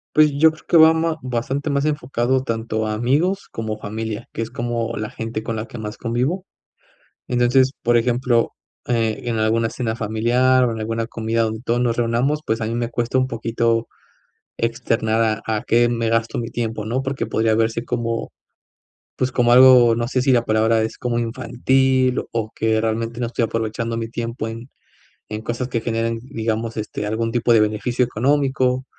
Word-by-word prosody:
Pues, 155 -1 +6
yo 160 +3 +5
creo 155 - -17
que 170 - +5
va 160 0 +8
ma 160 0 0
bastante 130 +3 -2
más 140 0 0
enfocado 130 -3 0
tanto 110 -2 -2
a 105 - -1
amigos 150 - 0
como 110 -1 -4
familia, 110 0 -5
que - - -3
es 115 - -3
como 115 -1 -3
la 110 0 -4
gente 115 -1 -5
con 115 - -3
la 110 +1 -4
que - - -9
más 105 -1 -6
convivo. 130 +11 -1 0.8
Entonces, 125 +2 +3
por 120 0 +3
ejemplo, 120 0 +2 0.3
eh, 115 -3 0
en 115 -2 -2
alguna 115 +1 +1
cena 115 -2 -3
familiar 120 +4 +2
o 120 - 0
en 110 - -6
alguna 115 +1 -2
comida 115 0 -1
donde 110 0 -3
todos 120 -1 0
nos 120 -2 +1
reunamos, 120 +6 0
pues, 110 +1 0
a 115 - -2
mí 115 +1 -2
me 120 0 -1
cuesta 120 +1 -1
un 130 0 +2
poquito 115 -1 0 0.7
externar 115 -2 0
a 110 -1 0
a - - -7
qué 120 +1 +3
me 115 -1 -1
gasto 115 0 0
mi 115 -1 -3
tiempo, 115 -2 -3
¿no?, 125 +4 -1
porque 135 0 -3
podría 110 0 +1
verse 115 +1 0
como, 115 -1 -2 0.9
pues, 130 0 -1
como 120 -1 +2
algo, 125 -2 +7
no 120 +1 -1
sé 130 0 0
si 135 +1 +2
la 120 -2 +4
palabra 110 +1 +2
es 110 - -4
como 120 -1 -1
infantil 130 +2 +1
o 110 -2 -2
que 110 0 +1
realmente 115 +1 -2
no 120 - 0
estoy 115 0 0
aprovechando 115 +1 -3
mi 115 -1 -4
tiempo 115 0 -4
en 115 +3 -8 0.6
en 105 0 -5
cosas 120 +3 -3
que 115 -2 -1
generen, 115 0 -1
digamos, 115 -2 -3
este, 105 -1 -4
algún 115 +2 -1
tipo 120 0 +2
de 110 - +6
beneficio 110 +4 +1
económico, 130 +1 +1
115 Hz, 190 wpm, -21 LUFS, 115-125 Hz, 0.9 s, va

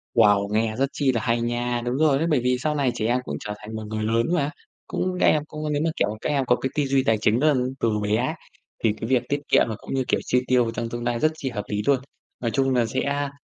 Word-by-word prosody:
Wow, 100 0 +5
nghe 110 0 +1
rất 135 +1 +1
chi 140 -3 +2
là 115 -3 -1
hay 115 -1 +1
nha, 120 0 -1
đúng 125 +2 -1
rồi 150 -2 +4
đấy, 160 - 0
bởi 140 - +4
vì 125 +1 +1
sau 150 +3 -1
này 140 -4 +1
trẻ 110 - -2
em 120 +3 +2
cũng - - -4
trở 105 - -5
thành 110 +1 -8
một 110 - -5
người 110 0 -3
lớn 115 +2 +1
mà. 150 -4 +1 0.4
Cũng 185 0 -2
các - - +3
em 150 - +3
cũng 150 0 -4
nếu 145 - 0
mà, - - +2
kiểu, 100 - +2
các - - -2
em 140 -3 +1
có 125 - +4
cái 130 - -3
tư 150 - +2
duy 135 -1 +2
tài 110 -3 +2
chính 110 +2 +3
rất 150 +1 +4
là 125 -1 +1 0.2
từ 115 - +2
bé 105 +1 +1
ấy 130 +7 0 0.5
thì 110 -2 +3
cái 115 - -2
việc 130 -2 +3
tiết 145 - +1
kiệm - - +5
và 110 - -3
cũng - - -7
như, 130 -1 +1
kiểu, - - +2
chi 125 - +2
tiêu 125 -2 +3
trong 115 +1 -4
tương 120 0 -5
lai 120 -1 -1
rất 155 +3 +3
chi 135 -4 -4
hợp 105 -4 -4
lý 105 0 -1
luôn. 140 -2 +4 0.4
Nói 115 -2 -1
chung 135 +3 +1
là 120 -2 +3
sẽ 140 +4 -1
125 Hz, 295 wpm, -24 LUFS, 115-140 Hz, 0.5 s, Wow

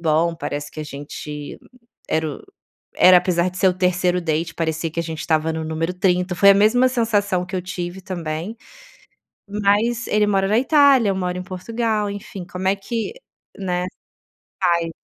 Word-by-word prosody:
Bom 165 +1 +2
parece 145 -2 -4
que - - -12
a - - -4
gente 145 0 -7 0.5
era 160 0 0
o - - -14 0.6
era 180 0 +9
apesar 175 0 +1
de 180 - -9
ser 190 - +4
o - - +2
3º 180 0 +1
date 165 0 -2
parecia 160 0 -2
que 165 - -8
a - - -1
gente 160 -1 -6
estava 160 0 +1
no 160 - -3
número 160 +2 -2
30, 180 0 +1
foi 200 +3 +6
a - - +7
mesma 230 +6 +4
sensação 205 -7 0
que 185 - -8
eu 180 - -2
tive 180 0 -5
também, 175 +3 -5 0.9
mas 210 +4 +1
ele 210 0 +2
mora 195 -1 +2
na 215 +3 +3
Itália 275 -4 +5
eu 195 - 0
moro 180 -1 -2
em 180 - -4
Portugal 210 +3 -2
enfim 200 -2 -7
como 180 +1 -4
é 195 - +3
que, 225 - -4 0.4
né, 180 -2 -2 0.8
fai 170 -2 +2
180 Hz, 180 wpm, -21 LUFS, 165-205 Hz, 0.9 s, era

